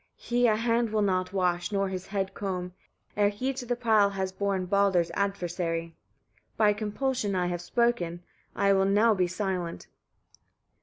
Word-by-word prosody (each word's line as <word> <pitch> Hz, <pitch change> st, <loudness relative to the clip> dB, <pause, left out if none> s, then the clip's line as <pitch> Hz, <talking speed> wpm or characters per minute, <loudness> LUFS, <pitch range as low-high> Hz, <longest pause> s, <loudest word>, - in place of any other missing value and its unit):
He 245 Hz, 0 st, +1 dB
a 215 Hz, -, +3 dB
hand 230 Hz, +1 st, +1 dB
will 215 Hz, -1 st, +1 dB
not 185 Hz, -2 st, 0 dB
wash, 180 Hz, -1 st, 0 dB
nor 195 Hz, -1 st, +1 dB
his 185 Hz, -1 st, -5 dB
head 195 Hz, -1 st, -2 dB
comb, 180 Hz, -3 st, -4 dB, 0.4 s
ere 205 Hz, 0 st, +3 dB
he 255 Hz, +7 st, -2 dB
to 250 Hz, -2 st, -7 dB
the 245 Hz, -, 0 dB
pile 220 Hz, -4 st, +3 dB
has 190 Hz, -1 st, -3 dB
borne 195 Hz, -1 st, -1 dB
Baldr's 190 Hz, -3 st, +2 dB
adversary. 175 Hz, -4 st, -2 dB, 0.6 s
By 210 Hz, -1 st, +4 dB
compulsion 215 Hz, 0 st, -2 dB
I 180 Hz, -1 st, +1 dB
have 175 Hz, -1 st, -2 dB
spoken; 175 Hz, -5 st, 0 dB, 0.3 s
I 200 Hz, 0 st, +3 dB
will 195 Hz, 0 st, +3 dB
now 210 Hz, +3 st, +4 dB
be 185 Hz, -3 st, +1 dB
silent." 180 Hz, -2 st, -3 dB
195 Hz, 160 wpm, -28 LUFS, 180-215 Hz, 0.6 s, By